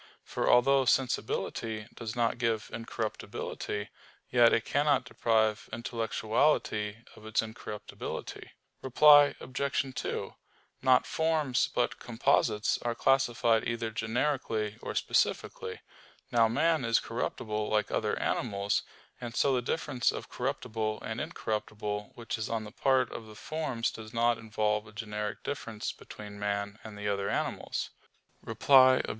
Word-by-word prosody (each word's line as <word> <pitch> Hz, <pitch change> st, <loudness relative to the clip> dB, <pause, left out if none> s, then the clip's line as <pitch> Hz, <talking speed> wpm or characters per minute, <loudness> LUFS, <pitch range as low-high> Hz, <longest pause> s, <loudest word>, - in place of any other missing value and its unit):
For -, -, -1 dB
although 135 Hz, +2 st, +5 dB
sensibility 115 Hz, -3 st, 0 dB
does 115 Hz, 0 st, -6 dB
not 120 Hz, 0 st, +1 dB
give 115 Hz, -3 st, -1 dB
incorruptibility, 110 Hz, -2 st, -4 dB, 0.4 s
yet 120 Hz, -1 st, +6 dB
it 115 Hz, -, +2 dB
cannot 145 Hz, -3 st, +2 dB
deprive 110 Hz, -3 st, +1 dB
intellectuality 115 Hz, -1 st, 0 dB
of -, -, -15 dB
its 110 Hz, 0 st, +1 dB
incorruptibility. 110 Hz, -1 st, -7 dB, 0.3 s
Reply 145 Hz, +2 st, +7 dB
Obj. 135 Hz, 0 st, -2 dB
2: -, -, -3 dB, 0.5 s
Not 130 Hz, -1 st, +5 dB
forms, 160 Hz, -5 st, +1 dB
but 120 Hz, -, 0 dB
composites, 115 Hz, -3 st, +1 dB
are 120 Hz, -1 st, -1 dB
classified 120 Hz, -4 st, +2 dB
either 115 Hz, -1 st, -2 dB
generically 110 Hz, -1 st, -1 dB
or -, -, -5 dB
specifically. -, -, 0 dB, 0.5 s
Now 115 Hz, -2 st, +5 dB
man 155 Hz, +5 st, +2 dB
is 115 Hz, -1 st, +3 dB
corruptible 110 Hz, -2 st, -3 dB
like 105 Hz, -1 st, +1 dB
other -, -, 0 dB
animals. 100 Hz, -4 st, 0 dB, 0.4 s
And 120 Hz, -1 st, -6 dB
so 140 Hz, -, +3 dB
the 125 Hz, -, +2 dB
difference 130 Hz, -1 st, 0 dB
of -, -, -7 dB
corruptible 110 Hz, -1 st, -2 dB
and 110 Hz, +1 st, -3 dB
incorruptible 105 Hz, -8 st, -3 dB
which 115 Hz, -1 st, -4 dB
is 110 Hz, -, -3 dB
on 115 Hz, -1 st, -1 dB
the 105 Hz, -, -9 dB
part 130 Hz, +1 st, +2 dB
of 115 Hz, -, -7 dB
the 110 Hz, -, -12 dB
forms 150 Hz, -3 st, -2 dB
does 110 Hz, +1 st, -10 dB
not 115 Hz, 0 st, +3 dB
involve 105 Hz, -1 st, -1 dB
a 105 Hz, -, -14 dB
generic 105 Hz, -1 st, -4 dB
difference 115 Hz, -6 st, -4 dB
between 105 Hz, -1 st, -10 dB
man 100 Hz, +1 st, -2 dB
and 110 Hz, -2 st, -9 dB
the 105 Hz, 0 st, -4 dB
other 100 Hz, -1 st, 0 dB
animals. -, -, -2 dB, 0.5 s
Reply 130 Hz, -2 st, +6 dB
Obj. -, -, -6 dB
115 Hz, 135 wpm, -30 LUFS, 110-130 Hz, 0.5 s, Reply